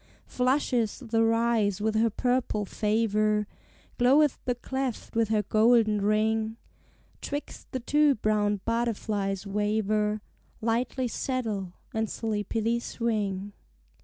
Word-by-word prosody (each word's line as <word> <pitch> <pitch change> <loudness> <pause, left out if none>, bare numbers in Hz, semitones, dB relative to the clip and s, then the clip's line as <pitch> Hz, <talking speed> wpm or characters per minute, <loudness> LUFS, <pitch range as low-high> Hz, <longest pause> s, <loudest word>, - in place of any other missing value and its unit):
Flusheth 250 -3 0
the 225 -1 +3
rise 225 -3 +2
with 215 +1 0
her 225 +1 +3
purple 245 -2 0
favor, 215 0 +1 0.5
Gloweth 275 +4 +4
the 245 - 0
cleft 265 -1 -4
with 225 -1 +2
her 215 -1 +2
golden 215 0 +3
ring, 220 +2 +1 0.6
'Twixt 290 +1 -6
the 260 - -2
two 295 +2 +3
brown 210 -2 +1
butterflies 215 -4 -1
waver, 210 +1 0 0.4
Lightly 240 +3 0
settle, 220 -8 -3 0.2
and 220 -1 -1
sleepily 225 +1 -1
swing. 205 -5 -2
220 Hz, 105 wpm, -28 LUFS, 210-240 Hz, 0.6 s, Gloweth